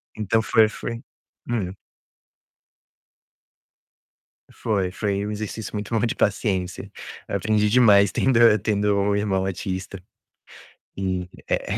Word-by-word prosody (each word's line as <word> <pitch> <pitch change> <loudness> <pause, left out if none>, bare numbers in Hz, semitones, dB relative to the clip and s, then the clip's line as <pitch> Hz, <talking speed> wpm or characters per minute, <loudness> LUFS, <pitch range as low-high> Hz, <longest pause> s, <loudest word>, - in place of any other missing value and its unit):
Então, 110 +1 +1
foi 110 0 +4
foi 115 +2 -6 0.5
hum. 100 -7 -2 2.8
Foi, 100 -5 -1
foi 100 +1 -2
um - - -3
exercício 105 0 -5
muito 105 +2 -4
bom 120 - +1
de 115 - -2
paciência. 95 -3 -1 0.4
Aprendi 105 -1 +1
demais 105 -5 +5
tendo 130 -3 +2 0.2
tendo 105 -1 +1
um 100 +1 +1
irmão 100 -2 0
autista. 95 0 -4 1.0
E 95 -2 -2 0.2
é - - -1
é - - -1
105 Hz, 110 wpm, -23 LUFS, 95-110 Hz, 2.8 s, demais